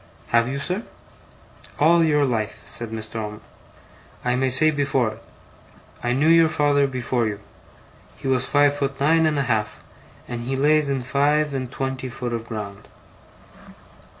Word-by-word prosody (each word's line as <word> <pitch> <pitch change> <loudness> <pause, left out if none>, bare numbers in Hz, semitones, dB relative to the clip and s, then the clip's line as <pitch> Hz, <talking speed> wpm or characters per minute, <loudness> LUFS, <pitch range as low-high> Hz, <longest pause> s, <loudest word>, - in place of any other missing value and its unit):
'Have 115 0 +3
you, 135 +2 -3
sir?' 180 +8 -2 1.0
'All 165 +3 +5
your 150 -2 +3
life,' 115 -5 -2
said 115 -1 -5
Mr. 110 0 -6
Omer. 105 -1 -5 0.9
'I 125 0 +2
may 130 +1 +1
say 150 +5 +5
before 135 -5 +1
it. 110 +1 -12 0.8
I 120 - -1
knew 140 +5 +2
your 165 0 +6
father 145 -2 +2
before 125 -3 -1
you. 105 -2 -4 0.8
He - - -6
was 130 -1 +2
five 145 0 +3
foot 140 -1 -3
nine 160 +3 +3
and 155 -1 0
a 140 - +1
half, 110 -4 -2 0.4
and 120 -1 -5
he 130 +3 -3
lays 150 +1 +3
in 135 -2 -1
five 145 +3 +1
and 130 -2 -4
twen 135 -1 -3
ty 130 0 -6
foot 120 -1 -5
of 115 0 -4
ground. 100 -3 -7
135 Hz, 165 wpm, -23 LUFS, 120-145 Hz, 1.0 s, your